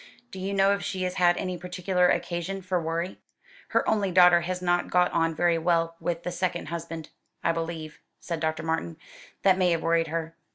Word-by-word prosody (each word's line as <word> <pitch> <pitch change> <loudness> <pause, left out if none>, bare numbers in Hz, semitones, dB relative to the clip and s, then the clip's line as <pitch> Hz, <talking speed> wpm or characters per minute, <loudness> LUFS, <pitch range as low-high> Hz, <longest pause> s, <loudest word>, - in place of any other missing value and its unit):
Do 190 - -8
you 190 +1 -3
know 195 0 +4
if 200 - -2
she 185 -1 -3
has 180 0 -1
had 175 -1 +4
any 185 -1 -3
particular 180 0 +1
occasion 180 +3 -2
for 180 -1 -1
worry?" 165 +3 -3 0.5
"Her - - +1
only 205 -3 +2
daughter 180 -1 +6
has 180 +1 -3
not 175 -1 0
got 180 0 +3
on 165 -1 +1
very 170 0 +2
well 165 0 +1
with 170 -1 -3
the 180 - -3
second 175 -2 -2
husband, 165 -1 -6 0.3
I 170 - +3
believe," 165 -2 -5 0.2
said 170 -2 -4
Dr. 160 0 -1
Martin. 160 0 -2 0.5
"That 190 -1 +4
may 180 -1 +4
have 165 -1 0
worried 165 0 +2
her." 165 0 -3
175 Hz, 200 wpm, -27 LUFS, 165-180 Hz, 0.5 s, daughter